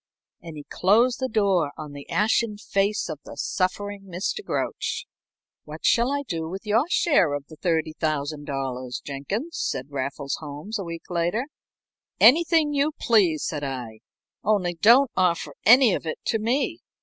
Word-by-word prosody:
And 165 -2 -9
he 145 - -8
closed 230 +6 +3
the 260 -1 -1
door 195 -9 +1
on 150 -1 -7
the 145 0 -10
ashen 215 0 +1
face 205 0 0
of 155 -3 -6
the - - -11
suffering 200 +1 -2
Mr. 185 - -3
Grouch. - - -3 0.6
"What - - -9
shall 240 +3 +3
I 285 0 -1
do 165 -4 -3
with 190 +4 -7
your 215 +5 +2
share 230 - +3
of 145 -1 -6
the 155 - -12
$30,000, 145 -6 -2
Jenkins?" 200 - -4
said 130 +3 -3
Raffles 140 +1 -3
Holmes 155 +9 -6
a - - -3
week 170 -1 -7
later. 175 +8 0 0.7
"Anything 310 +4 +5
you 290 +2 +1
please," 190 - +3
said 150 -2 -3
I. 125 -5 -5 0.4
"Only 195 -5 +1
don't 235 +9 +5
offer 170 -5 +1
any 245 -2 +7
of 165 - -3
it 155 - -3
to 225 - +1
me. 265 +9 0
185 Hz, 155 wpm, -24 LUFS, 150-230 Hz, 0.7 s, any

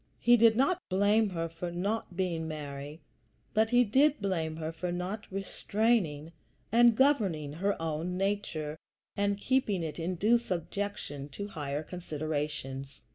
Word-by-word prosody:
He 240 - +5
did 225 -1 +6
not 275 +9 +2
blame 205 +3 +3
her 165 -3 -2
for 165 +2 -5
not 185 +1 -2
being 170 -4 -1
Mary; 145 0 -6 0.5
but 220 +1 +3
he 245 +1 +5
did 275 +7 +3
blame 165 -5 -1
her 160 0 -4
for 175 +2 -4
not 185 +5 -4
restraining 195 -5 0 0.4
and 235 0 +6
governing 195 - +2
her 195 +5 -1
own 165 +3 -2
nature 185 -6 -2 0.4
and 200 -1 +1
keeping 210 -6 +1
it 160 +1 -5
in 175 +3 -2
due 220 +7 +4
subjection 180 -7 -4
to 200 +9 -6
higher 145 -4 -3
considerations. 145 -5 -4
180 Hz, 140 wpm, -30 LUFS, 155-210 Hz, 0.5 s, did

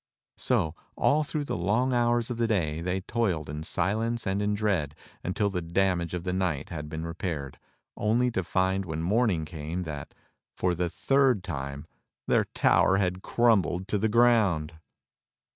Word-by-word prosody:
So 80 - +1 0.2
all 150 +2 +3
through 150 0 -3
the 140 - -3
long 110 +9 +1
hours 120 -1 +2
of 120 - -3
the 115 -1 +1
day 80 -8 0
they 90 +2 -1
toiled 95 -8 -1
in 75 +1 -5
silence 110 +8 -1
and 95 +1 0
in 105 0 +1
dread 95 -9 0 0.3
until 100 +3 0
the 90 -2 -2
damage 85 0 0
of 85 - -4
the 90 0 -2
night 90 -7 -1
had 75 -3 -6
been 80 +1 -4
repaired, 80 -5 -4 0.4
only 120 +4 +1
to 95 -4 -1
find 95 +2 +1
when 80 -2 -4
morning 100 -4 +2
came 80 +2 -5
that, 75 -4 -7 0.4
for 90 -1 +1
the 85 0 -1
third 135 -2 +2
time, 70 -4 -5 0.4
their - - +3
tower 95 - +4
had 90 -1 0
crumbled 95 -7 +2
to 105 - +1
the 110 +2 +1
ground. 105 -9 +3
95 Hz, 165 wpm, -28 LUFS, 80-110 Hz, 0.4 s, tower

